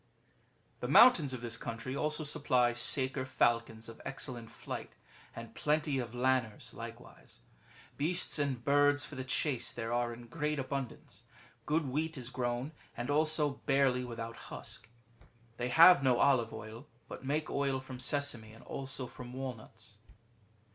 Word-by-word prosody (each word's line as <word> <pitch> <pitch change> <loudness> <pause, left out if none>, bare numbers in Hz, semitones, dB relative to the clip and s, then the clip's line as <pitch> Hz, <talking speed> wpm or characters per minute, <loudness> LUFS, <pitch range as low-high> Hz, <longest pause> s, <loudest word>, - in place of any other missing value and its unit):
"^] - - -36
The - - -3
mountains 165 - +7
of 130 -2 -5
this 115 -1 -5
country 115 +3 -5
also 150 +2 -1
supply 130 -5 +2
Saker 130 +2 +3
falcons 115 -3 0
of 115 - -11
excellent 130 -4 -5
flight, - - -7 0.4
and 115 -1 -9
plenty 150 -1 0
of 120 -2 -5
Lanners 125 -3 0
like - - -8
wise. - - -16 0.6
Beasts 165 +2 +2
and 135 -5 -2
birds 145 0 +4
for - - -11
the 130 - -4
chase 130 0 0
there 115 0 -4
are 120 0 0
in 120 0 -9
great 150 +4 -2
abundance. 135 -1 -5 0.4
Good 155 -1 +1
wheat 155 +4 -2
is 125 -1 -7
grown, 125 +2 -2 0.3
and 120 +4 -2
also 150 -1 +2
barley 135 -3 +3
with 120 -2 -7
out 115 0 -6
husk. 105 - -8 0.7
They 120 +1 -2
have 165 +4 +8
no 130 -3 +3
olive 130 -5 +3
oil, 110 +1 -9 0.2
but - - -9
make 150 +3 -1
oil 140 -1 0
from 130 -1 -9
sesame, 125 -5 -1
and 115 - -15
also 135 -1 -4
from 125 0 -10
walnuts. 115 -4 -8
130 Hz, 155 wpm, -33 LUFS, 120-145 Hz, 0.7 s, have